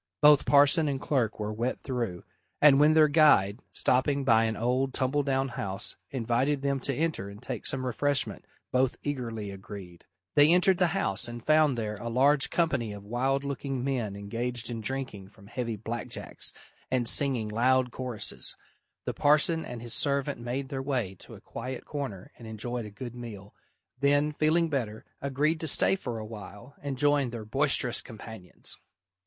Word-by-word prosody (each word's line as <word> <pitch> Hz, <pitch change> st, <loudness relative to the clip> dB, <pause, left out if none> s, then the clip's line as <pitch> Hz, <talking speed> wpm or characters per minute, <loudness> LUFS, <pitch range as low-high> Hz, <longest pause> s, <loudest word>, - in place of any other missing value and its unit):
Both 150 Hz, -1 st, +6 dB
parson 145 Hz, +3 st, +5 dB
and 140 Hz, -2 st, -1 dB
clerk 125 Hz, -7 st, 0 dB
were 105 Hz, 0 st, -3 dB
wet 120 Hz, +4 st, -2 dB
through, 120 Hz, -9 st, -3 dB, 0.4 s
and 140 Hz, -2 st, +7 dB
when 150 Hz, +1 st, +5 dB
their 155 Hz, -1 st, +7 dB
guide, 145 Hz, -9 st, +5 dB
stopping 140 Hz, +2 st, +2 dB
by 115 Hz, -3 st, +4 dB
an 110 Hz, -1 st, -2 dB
old, 130 Hz, +3 st, 0 dB
tumble 135 Hz, +2 st, +1 dB
down 135 Hz, -1 st, 0 dB
house, 100 Hz, -2 st, -3 dB
invited 130 Hz, +3 st, 0 dB
them 140 Hz, -1 st, +1 dB
to 140 Hz, +2 st, -2 dB
enter 155 Hz, -11 st, -1 dB
and 100 Hz, +1 st, -11 dB
take -, -, -4 dB
some 130 Hz, -1 st, -1 dB
refreshment, 140 Hz, +3 st, -1 dB, 0.3 s
both 130 Hz, 0 st, +2 dB
eagerly 115 Hz, -7 st, -4 dB
agreed. 95 Hz, -3 st, -10 dB, 0.3 s
They 145 Hz, +2 st, +6 dB
entered 180 Hz, +1 st, +4 dB
the 180 Hz, -, +4 dB
house 100 Hz, -, -1 dB
and 120 Hz, 0 st, -8 dB
found 155 Hz, -4 st, +4 dB
there 105 Hz, -2 st, -3 dB
a 115 Hz, +3 st, -5 dB
large 140 Hz, +4 st, +3 dB
company 140 Hz, -10 st, 0 dB
of 100 Hz, -1 st, -9 dB
wild 135 Hz, +5 st, 0 dB
looking 140 Hz, -2 st, -3 dB
men 125 Hz, -7 st, -2 dB
engaged 115 Hz, +4 st, -3 dB
in 115 Hz, -1 st, -4 dB
drinking 125 Hz, -5 st, -4 dB
from 100 Hz, 0 st, -18 dB
heavy 115 Hz, +1 st, -3 dB
black 115 Hz, +3 st, -5 dB
jacks, -, -, -5 dB, 0.4 s
and 125 Hz, -2 st, 0 dB
singing 130 Hz, -6 st, +1 dB
loud 125 Hz, +3 st, +2 dB
choruses. 120 Hz, -5 st, -1 dB, 0.5 s
The -, -, -2 dB
parson 155 Hz, +3 st, +3 dB
and 120 Hz, -1 st, -7 dB
his 120 Hz, -1 st, -2 dB
servant 140 Hz, -1 st, +1 dB
made 130 Hz, +3 st, -3 dB
their 135 Hz, -1 st, -3 dB
way 130 Hz, -8 st, -1 dB
to -, -, -12 dB
a -, -, -14 dB
quiet 130 Hz, 0 st, -6 dB
corner 135 Hz, -11 st, -5 dB
and 115 Hz, -, -10 dB
enjoyed 115 Hz, +2 st, -4 dB
a -, -, -8 dB
good 120 Hz, +3 st, -8 dB
meal, 110 Hz, -5 st, -9 dB, 0.5 s
then, 145 Hz, +2 st, +3 dB
feeling 155 Hz, +3 st, +2 dB
better, 120 Hz, -8 st, -3 dB, 0.2 s
agreed 145 Hz, +4 st, 0 dB
to 160 Hz, -, -3 dB
stay 155 Hz, -, +3 dB
for 125 Hz, -11 st, -5 dB
a 110 Hz, -, -5 dB
while 110 Hz, +3 st, -10 dB
and 140 Hz, -2 st, -4 dB
join 145 Hz, -1 st, +2 dB
their 115 Hz, -2 st, -7 dB
boisterous 135 Hz, 0 st, +2 dB
companions. 110 Hz, -4 st, -6 dB
130 Hz, 175 wpm, -28 LUFS, 110-140 Hz, 0.5 s, and